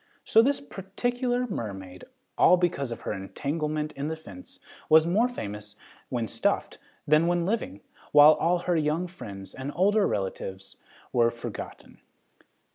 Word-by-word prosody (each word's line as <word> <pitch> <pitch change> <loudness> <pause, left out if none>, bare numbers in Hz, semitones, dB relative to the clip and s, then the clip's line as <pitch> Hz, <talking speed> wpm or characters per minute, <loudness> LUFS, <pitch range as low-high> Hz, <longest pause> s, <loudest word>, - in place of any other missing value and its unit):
So 225 - +6
this 275 +4 +1
particular 245 +3 -2
mermaid, 95 - -6 0.3
all 180 - +6
because 150 -8 -1
of 115 - -6
her - - -3
entanglement 150 +9 -3
in 140 +2 -4
the 160 - -2
fence, 100 -13 -13 0.3
was 160 0 +7
more 205 +8 +3
famous 105 - -7 0.3
when 120 -3 -1
stuffed - - -1 0.3
than 155 +3 +4
when 175 -1 +1
living, 195 - -2 0.3
while 150 +1 +9
all 175 +3 +1
her 180 - +2
young 155 +2 0
friends 100 - -9
and 135 +2 -5
older 205 +3 +3
relatives 95 0 -4 0.4
were 120 -1 +4
forgotten. 120 -1 -8
155 Hz, 140 wpm, -27 LUFS, 115-185 Hz, 0.4 s, while